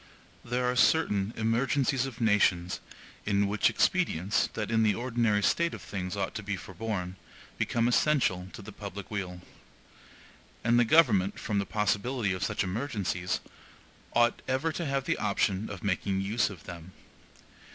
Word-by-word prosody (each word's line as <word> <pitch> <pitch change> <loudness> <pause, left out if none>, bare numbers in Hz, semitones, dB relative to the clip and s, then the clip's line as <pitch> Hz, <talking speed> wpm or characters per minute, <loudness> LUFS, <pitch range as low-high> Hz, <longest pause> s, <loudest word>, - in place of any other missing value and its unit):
There 125 +1 -1
are 125 0 +1
certain 105 -8 +3
emergencies 125 +4 +1
of 125 -3 -9
nations, 100 -5 +2 0.4
in 100 -1 +2
which 105 +1 +2
expedients, 105 - +1
that 105 0 -3
in 115 0 +3
the 105 -2 +3
ordinary 115 -4 +1
state 170 +10 +2
of - - -10
things 90 -1 -4
ought 100 - -2
to - - -4
be 100 -1 -3
forborne, 95 0 -5 0.4
become 115 0 +1
essential 120 -9 +2
to 100 - -9
the 105 - -9
public 100 -1 -8
weal. 90 -4 -4 1.2
And 120 +2 +4
the 120 - +5
government, 110 - +4
from 105 -2 -1
the 100 - -2
possibility 105 +1 0
of 90 +1 -3
such - - 0
emergencies, 95 -4 -2 0.7
ought 120 0 +3
ever 130 +5 0
to 165 0 -3
have 135 -1 0
the - - 0
option 100 0 0
of 95 -3 -8
making 95 0 0
use 105 +4 +1
of 95 -6 -11
them. 90 0 -9
105 Hz, 155 wpm, -29 LUFS, 95-120 Hz, 1.2 s, the